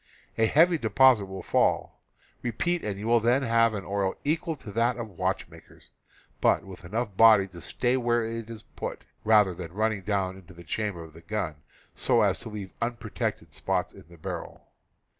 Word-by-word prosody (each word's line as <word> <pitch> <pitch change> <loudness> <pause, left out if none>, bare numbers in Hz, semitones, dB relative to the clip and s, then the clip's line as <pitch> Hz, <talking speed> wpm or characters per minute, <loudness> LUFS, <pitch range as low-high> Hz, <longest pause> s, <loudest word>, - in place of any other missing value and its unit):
A 110 0 +3
heavy 165 +6 +4
deposit 120 -2 +5
will 95 0 -7
fall. - - +1 0.4
Repeat, 170 +9 -1
and 100 -2 -3
you 105 - -6
will 120 +1 +4
then 120 +4 +2
have 115 -2 +3
an 100 -2 -5
oil 100 -1 -1
equal 160 +2 -1
to 110 -7 -10
that 115 +4 +1
of 115 -2 -5
watchmakers, - - -5 0.5
but - - +3
with 95 -1 -11
enough 105 +3 -3
body 110 -2 +7
to 85 -2 -11
stay 125 +8 0
where 120 -2 +1
it 115 0 -5
is 110 -2 -8
put, - - -7 0.2
rather 105 -4 +5
than 85 -1 -7
running 110 0 0
down 95 -1 -1
into 90 -2 -15
the 85 - -12
chamber 90 +1 -3
of 80 -1 -13
the 80 - -13
gun 90 -3 -3 0.4
so - - +2
as - - +2
to - - -6
leave 105 -3 -7
unprotected 120 -1 -3
spots - - -1
in - - -14
the 85 - -15
barrel. 80 - -7
110 Hz, 185 wpm, -27 LUFS, 95-120 Hz, 0.5 s, body